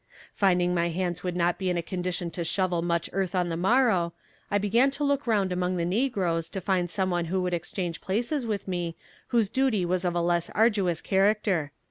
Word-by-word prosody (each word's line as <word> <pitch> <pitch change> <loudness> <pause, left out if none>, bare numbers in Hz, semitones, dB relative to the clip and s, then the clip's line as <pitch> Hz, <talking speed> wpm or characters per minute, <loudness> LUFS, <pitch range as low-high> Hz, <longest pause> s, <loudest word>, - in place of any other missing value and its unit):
Finding 180 -3 +2
my 170 -1 +1
hands 175 0 -2
would 180 -1 -2
not 175 0 +1
be 190 -1 -1
in 180 - 0
a 170 - -1
condition 180 -1 -3
to 170 - -3
shovel 175 0 0
much 170 -1 0
earth 190 -1 -1
on 180 -1 +1
the 165 - -2
morrow, 190 -2 +2 0.4
I 205 - +2
began 225 +7 +3
to 280 +2 -4
look 280 -1 0
round 200 -5 +2
among 180 0 0
the 170 - 0
negroes 180 -6 0
to 195 - -4
find 185 -2 0
some 185 +1 -1
one 175 -1 0
who 185 +3 -1
would 180 -1 -1
exchange 175 0 -3
places 240 +8 -1
with 210 -4 -3
me 175 -3 -2 0.3
whose 230 -3 +2
duty 230 -4 +1
was 180 +1 0
of 175 -1 0
a - - +2
less 170 0 +1
arduous 200 -6 +2
character. 195 -6 +2
185 Hz, 210 wpm, -27 LUFS, 175-205 Hz, 0.4 s, began